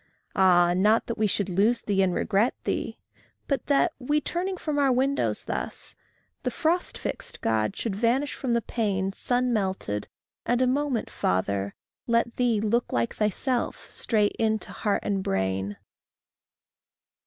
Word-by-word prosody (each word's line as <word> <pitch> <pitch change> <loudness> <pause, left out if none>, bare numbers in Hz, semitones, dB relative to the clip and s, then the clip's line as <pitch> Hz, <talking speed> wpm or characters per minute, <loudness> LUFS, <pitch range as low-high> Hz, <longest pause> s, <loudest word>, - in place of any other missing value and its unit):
Ah, 175 -2 +5
not 210 +5 +3
that 235 - -3
we 215 - +3
should 200 0 0
lose 205 +6 +2
thee 200 -2 +1
and 190 -1 +3
regret 210 +6 +1
thee! - - -2 0.5
But 275 -4 -1
that, 295 +4 +3
we 290 +3 +1
turning 365 +5 -2
from 305 -3 -2
our 275 -2 +4
windows 270 +3 +1
thus, - - -5 0.5
The - - -1
frost 345 +2 0
fixed - - -5
God 110 -1 0
should 220 -5 -3
vanish 245 +7 +1
from 255 -3 -2
the 235 -1 +1
pane, 195 -4 -1
Sun 245 +3 0
melted, 190 - -2 0.4
and 245 0 +1
a 255 - +4
moment, 265 -2 0
Father, 100 +2 -1 0.3
let 235 0 +1
thee 240 -4 +2
Look 225 +3 0
like 115 -1 0
thyself 235 +4 -1
straight 210 -3 +1
into 220 -1 0
heart 205 -2 0
and 200 -2 0
brain. 95 - -1
220 Hz, 150 wpm, -26 LUFS, 190-250 Hz, 0.5 s, Ah